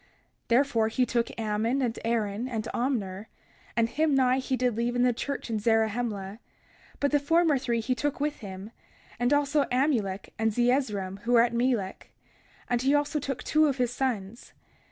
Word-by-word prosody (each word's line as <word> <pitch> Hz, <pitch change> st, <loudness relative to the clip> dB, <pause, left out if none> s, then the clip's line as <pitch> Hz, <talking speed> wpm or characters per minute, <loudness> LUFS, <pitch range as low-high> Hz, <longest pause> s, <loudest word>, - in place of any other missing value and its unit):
31:6 -, -, -32 dB, 0.4 s
Therefore 235 Hz, -2 st, +3 dB
he 250 Hz, +3 st, +1 dB
took 235 Hz, -1 st, -2 dB
Ammon, 220 Hz, +4 st, 0 dB
and 235 Hz, -2 st, -2 dB
Aaron, 225 Hz, 0 st, -1 dB
and 225 Hz, -4 st, -3 dB
Omner; 215 Hz, -6 st, -2 dB, 0.5 s
and 230 Hz, -1 st, +3 dB
Himni 265 Hz, -1 st, +2 dB
he 260 Hz, 0 st, -1 dB
did 250 Hz, -3 st, 0 dB
leave 235 Hz, +1 st, -1 dB
in 245 Hz, -, +2 dB
the 250 Hz, -1 st, +3 dB
church 280 Hz, +4 st, -4 dB
in 225 Hz, -2 st, -2 dB
Zarahemla; 220 Hz, -2 st, 0 dB, 0.6 s
but 285 Hz, -, +1 dB
the 290 Hz, -, +4 dB
former 320 Hz, 0 st, +3 dB
three 235 Hz, -2 st, -1 dB
he 255 Hz, +3 st, 0 dB
took 290 Hz, +4 st, -2 dB
with 295 Hz, +1 st, -1 dB
him, 195 Hz, 0 st, -8 dB, 0.5 s
and 245 Hz, +2 st, +1 dB
also 290 Hz, 0 st, +2 dB
Amulek 235 Hz, -8 st, 0 dB
and 220 Hz, 0 st, +2 dB
Zeezrom, 215 Hz, -5 st, 0 dB
who 235 Hz, +4 st, -1 dB
were 230 Hz, -1 st, +7 dB
at 235 Hz, -, 0 dB
Melek; 235 Hz, -5 st, -1 dB, 0.6 s
and 245 Hz, -1 st, 0 dB
he 275 Hz, +3 st, +3 dB
also 290 Hz, +1 st, 0 dB
took 270 Hz, -3 st, -4 dB
two 310 Hz, 0 st, +3 dB
of 275 Hz, -2 st, -1 dB
his 245 Hz, -1 st, 0 dB
sons. 235 Hz, -5 st, -3 dB
240 Hz, 175 wpm, -27 LUFS, 220-270 Hz, 0.6 s, were